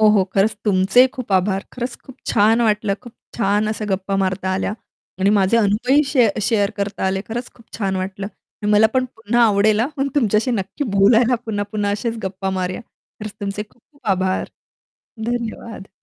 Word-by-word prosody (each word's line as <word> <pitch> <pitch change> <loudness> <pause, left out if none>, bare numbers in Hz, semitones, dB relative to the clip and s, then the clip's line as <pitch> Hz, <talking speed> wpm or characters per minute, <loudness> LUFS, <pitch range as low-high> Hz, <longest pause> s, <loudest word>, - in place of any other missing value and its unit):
हो, 215 - +6
हो, 210 -3 +4
खरंच, 210 +2 +3
तुमचेही 205 +6 +5
खूप 245 -6 -6
आभार. 190 +1 +1
खरंच, 245 0 -4
खूप 265 - -12
छान 225 +2 +3
वाटलं. 210 -2 +1
खूप 240 -2 -12 0.2
छान 205 -1 +1
अशा 215 0 -3
गप्पा 195 +1 -1
मारता 190 0 -1
आल्या 190 +1 -1 0.5
आणि 195 - +4
माझे 195 +4 +3
अनुभवही 230 +7 +3
शे 255 -6 +4 0.2
शेअर 205 -2 +2
करता 200 -1 -2
आले. 190 0 0
खरंच, 240 +2 -4
खूप 230 - -19
छान 195 -2 -1
वाटलं. 190 +1 -4 0.4
आणि 210 - 0
मला 210 +1 +6
पण 255 0 +3
पुन्हा 230 +2 +1
आवडेल 210 +1 +3
हं, 240 - +1
मग 275 - +1
तुमच्याशी 230 -3 +2
नक्की 210 +5 -2
बोलायला 230 +5 +5
पुन्हा 205 -2 -1
पुन्हा 205 -1 0
असेच 225 +3 -2
गप्पा 190 0 -3
मारूया. 185 -1 -2 0.4
खरंच, 210 -1 -6
तुमचे 200 +1 -3
खूप-खूप 285 +3 -25
आभार, 185 0 -1 0.8
धन्यवाद. 230 -3 -4
210 Hz, 175 wpm, -20 LUFS, 195-230 Hz, 0.8 s, हो